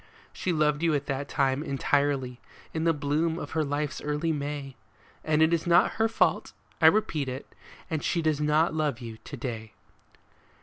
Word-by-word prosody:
She 185 Hz, -, -2 dB
loved 150 Hz, -2 st, +2 dB
you 165 Hz, -2 st, +2 dB
at 140 Hz, 0 st, -1 dB
that 140 Hz, +1 st, -3 dB
time 135 Hz, 0 st, +1 dB
entirely, 140 Hz, -3 st, 0 dB, 0.3 s
in 160 Hz, 0 st, -1 dB
the 165 Hz, -, +5 dB
bloom 155 Hz, +2 st, 0 dB
of 145 Hz, -, -6 dB
her 160 Hz, -1 st, +1 dB
life's 145 Hz, +1 st, -2 dB
early 150 Hz, +2 st, -1 dB
May, 145 Hz, -2 st, -4 dB, 0.5 s
And 155 Hz, 0 st, +3 dB
it 160 Hz, +1 st, +3 dB
is 170 Hz, 0 st, 0 dB
not 175 Hz, +1 st, +5 dB
her 225 Hz, -, +5 dB
fault, 225 Hz, -, +1 dB, 0.3 s
I -, -, +8 dB
repeat 155 Hz, -10 st, +2 dB
it, 130 Hz, +2 st, -6 dB, 0.4 s
that 160 Hz, -4 st, -2 dB
she 170 Hz, -2 st, 0 dB
does 155 Hz, -2 st, +1 dB
not 150 Hz, +2 st, +3 dB
love 150 Hz, -5 st, 0 dB
you 115 Hz, -3 st, -8 dB
to 140 Hz, -, -8 dB
day. 115 Hz, -3 st, -5 dB
150 Hz, 180 wpm, -27 LUFS, 140-160 Hz, 0.5 s, I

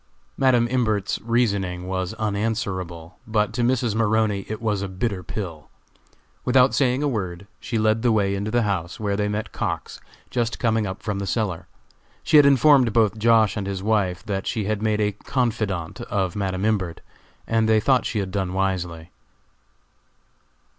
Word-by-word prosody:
Madam 125 Hz, -3 st, +3 dB
Imbert's 110 Hz, -6 st, 0 dB
reasoning 100 Hz, -7 st, 0 dB
was 95 Hz, -1 st, -3 dB
unanswerable, 100 Hz, -6 st, -3 dB
but 105 Hz, -1 st, 0 dB
to 120 Hz, -, -1 dB
Mrs. 120 Hz, -2 st, +1 dB
Maroney 110 Hz, -2 st, +1 dB
it 110 Hz, -, -4 dB
was 105 Hz, -3 st, -1 dB
a 100 Hz, -, -2 dB
bitter 95 Hz, +1 st, -2 dB
pill. 85 Hz, -3 st, -6 dB, 0.7 s
Without 130 Hz, +1 st, +4 dB
saying 130 Hz, 0 st, +2 dB
a -, -, +2 dB
word, 95 Hz, -7 st, -3 dB
she 120 Hz, -, -3 dB
led 110 Hz, +1 st, +2 dB
the 120 Hz, 0 st, +3 dB
way 100 Hz, -3 st, +2 dB
into 100 Hz, +2 st, -2 dB
the 120 Hz, +1 st, +2 dB
house, 90 Hz, -4 st, -2 dB
where 100 Hz, -2 st, -1 dB
they 105 Hz, 0 st, 0 dB
met 105 Hz, +1 st, -3 dB
Cox, -, -, -4 dB, 0.3 s
just 120 Hz, -2 st, -1 dB
coming 110 Hz, -3 st, +1 dB
up 95 Hz, -, -7 dB
from 105 Hz, -2 st, -2 dB
the 100 Hz, -, -4 dB
cellar. 100 Hz, -6 st, -2 dB, 0.6 s
She 155 Hz, -, +5 dB
had 145 Hz, -1 st, +8 dB
informed 135 Hz, -3 st, +5 dB
both 110 Hz, -2 st, +2 dB
Josh. 110 Hz, -1 st, +4 dB
and 100 Hz, -3 st, -3 dB
his 95 Hz, -1 st, -4 dB
wife 100 Hz, -4 st, 0 dB
that 100 Hz, -3 st, -3 dB
she 110 Hz, -, -1 dB
had 105 Hz, +1 st, -2 dB
made 110 Hz, -1 st, +1 dB
a 105 Hz, 0 st, +2 dB
confidante 105 Hz, -6 st, -2 dB
of 95 Hz, -3 st, -1 dB
Madam 95 Hz, -1 st, -2 dB
Imbert, 95 Hz, -6 st, -1 dB, 0.4 s
and 115 Hz, -1 st, +1 dB
they 110 Hz, -1 st, +5 dB
thought 130 Hz, +3 st, +2 dB
she 115 Hz, -, -3 dB
had 95 Hz, -2 st, -2 dB
done 95 Hz, -2 st, -2 dB
wisely. 90 Hz, -3 st, -2 dB
105 Hz, 170 wpm, -23 LUFS, 95-115 Hz, 0.7 s, had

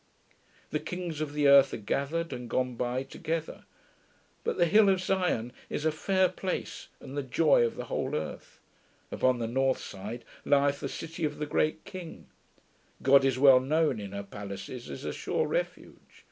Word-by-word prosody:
The -, -, 0 dB
kings 175 Hz, -4 st, -5 dB
of 150 Hz, -2 st, -3 dB
the 145 Hz, -1 st, +2 dB
earth 140 Hz, -1 st, +7 dB
are -, -, -4 dB
gathered 140 Hz, +9 st, -2 dB
and 125 Hz, -1 st, -6 dB
gone 130 Hz, +1 st, 0 dB
by 125 Hz, +2 st, -2 dB
together; 160 Hz, +4 st, -4 dB, 0.8 s
but -, -, -1 dB
the 175 Hz, -, +4 dB
hill 205 Hz, +4 st, +5 dB
of 190 Hz, -1 st, +3 dB
Sion 180 Hz, -11 st, 0 dB, 0.2 s
is 150 Hz, -, -3 dB
a 160 Hz, -, +3 dB
fair 185 Hz, +4 st, +2 dB
place 180 Hz, -3 st, -4 dB
and 135 Hz, -, -9 dB
the 145 Hz, -, 0 dB
joy 135 Hz, +1 st, +3 dB
of 115 Hz, -, 0 dB
the -, -, -5 dB
whole -, -, -2 dB
earth; 75 Hz, 0 st, -6 dB, 0.5 s
upon 130 Hz, -1 st, +2 dB
the 115 Hz, -, -2 dB
north 130 Hz, +3 st, +1 dB
side 105 Hz, +5 st, -7 dB, 0.2 s
lieth 140 Hz, 0 st, +3 dB
the 140 Hz, -, -4 dB
city 165 Hz, +3 st, -6 dB
of 150 Hz, -1 st, -1 dB
the 150 Hz, -, -2 dB
great 155 Hz, +1 st, 0 dB
King; 175 Hz, -3 st, -9 dB, 0.8 s
God 135 Hz, 0 st, +6 dB
is 135 Hz, -2 st, +2 dB
well 135 Hz, -1 st, +8 dB
known 150 Hz, -1 st, +1 dB
in 100 Hz, -2 st, -7 dB
her 100 Hz, 0 st, -5 dB
palaces 100 Hz, +5 st, -8 dB
as -, -, -7 dB
a -, -, -2 dB
sure 475 Hz, -, -1 dB
refuge. -, -, -3 dB
140 Hz, 180 wpm, -29 LUFS, 125-165 Hz, 0.8 s, well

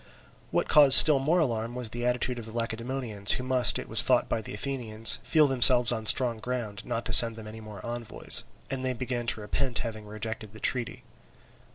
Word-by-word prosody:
What -, -, -3 dB
caused 145 Hz, -3 st, +6 dB
still 150 Hz, -4 st, +5 dB
more 155 Hz, +6 st, -1 dB
alarm 120 Hz, -7 st, -4 dB
was 125 Hz, -3 st, -7 dB
the 120 Hz, +2 st, -6 dB
attitude 125 Hz, 0 st, -4 dB
of 115 Hz, -, -11 dB
the -, -, -12 dB
Lacedaemonians, 115 Hz, -2 st, -4 dB
who 125 Hz, -, -5 dB
must, 130 Hz, -1 st, 0 dB
it -, -, -9 dB
was -, -, +6 dB
thought -, -, +1 dB
by 110 Hz, -, -4 dB
the -, -, -12 dB
Athenians, 115 Hz, -3 st, +1 dB
feel 155 Hz, -2 st, 0 dB
themselves 125 Hz, -3 st, +5 dB
on 110 Hz, -1 st, -6 dB
strong 120 Hz, -3 st, +2 dB
ground 115 Hz, -3 st, -7 dB
not 115 Hz, -, -7 dB
to -, -, -5 dB
send 115 Hz, -1 st, +8 dB
them 110 Hz, -1 st, -13 dB
any 110 Hz, +1 st, -12 dB
more 105 Hz, -2 st, -13 dB
envoys; 120 Hz, -1 st, 0 dB, 0.3 s
and 130 Hz, -1 st, -6 dB
they 130 Hz, 0 st, -4 dB
began 120 Hz, -1 st, -7 dB
to 110 Hz, -, -4 dB
repent 120 Hz, +4 st, -4 dB
having 110 Hz, -2 st, -9 dB
rejected 110 Hz, 0 st, -9 dB
the 110 Hz, -, -15 dB
treaty. 120 Hz, -1 st, -4 dB
120 Hz, 205 wpm, -25 LUFS, 110-130 Hz, 0.3 s, send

